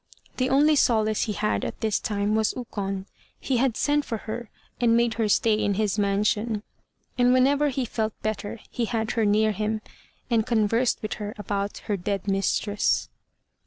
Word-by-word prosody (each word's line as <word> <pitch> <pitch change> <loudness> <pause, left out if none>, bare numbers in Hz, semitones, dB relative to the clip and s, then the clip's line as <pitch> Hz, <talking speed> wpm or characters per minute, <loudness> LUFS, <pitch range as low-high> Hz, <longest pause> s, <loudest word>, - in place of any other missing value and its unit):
The 255 0 +1
only 295 +3 +4
solace 220 -5 +2
he 215 - -2
had 210 +1 -1
at - - -4
this 220 -2 +1
time 205 0 -1
was 220 0 +1
Ukon; 195 -5 -4 0.3
he 260 - 0
had 250 -2 +1
sent 290 0 +2
for 230 - -3
her, 225 0 -5 0.3
and 230 -1 +4
made 235 -1 +2
her 220 -2 0
stay 220 +2 +3
in 205 -2 +1
his 210 0 0
mansion. 210 +2 +1 0.6
And 245 0 +5
whenever 280 +3 +3
he 265 -1 -2
felt 220 -2 -3
better 215 0 -3
he 240 - -1
had 225 0 -1
her 225 -2 +1
near 215 +1 +3
him, 215 +2 -1 0.5
and 230 -3 +2
conversed 230 +1 +1
with 215 - -2
her 210 0 -5
about 200 -1 -3
her 205 - -1
dead 195 +2 -3
mistress. 200 +1 +1
220 Hz, 175 wpm, -25 LUFS, 205-240 Hz, 0.6 s, And